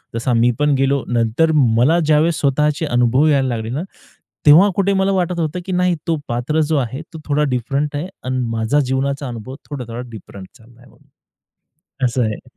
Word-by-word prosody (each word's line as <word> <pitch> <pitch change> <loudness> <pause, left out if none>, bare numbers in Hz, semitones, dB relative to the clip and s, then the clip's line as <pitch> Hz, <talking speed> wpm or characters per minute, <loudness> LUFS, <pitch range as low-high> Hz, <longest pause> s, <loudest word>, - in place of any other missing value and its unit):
तसा 120 +2 -1
मी 120 +1 +3
पण 150 0 +2
गेलो. 135 0 +1
नंतर 120 +7 +1 0.3
मला 155 +9 +4
ज्यावेळेस 155 +1 +2
स्वतःचे 150 +2 +1
अनुभव 125 +1 +2
यायला 140 -3 +2
लागले 115 -3 -3
ना, 135 +6 -3 0.6
तेव्हा 160 +7 +7
कुठे 200 0 +1
मला 195 0 +1
वाटत 180 -2 -1
होतं, 160 +2 -2
की 190 - -5
नाही 180 -1 +1
तो 165 - +2
पात्र 125 +7 -1
जो 155 - +2
आहे, 130 +1 -3
तो 160 - -8
थोडा 150 0 +1
डिफरंट 140 +5 -2
आहे 150 +5 -3 0.2
आणि 130 0 -2
माझा 115 +5 +1
जीवनाचा 140 +1 -1
अनुभव 120 +2 -7
थोडा-थोडा 125 -5 -6
डिफरंट 100 -3 -11
चालला 120 0 -20
आहे. 125 - -19 1.1
असं 125 0 +1
आहे. 110 -2 -5
140 Hz, 175 wpm, -18 LUFS, 120-155 Hz, 1.1 s, तेव्हा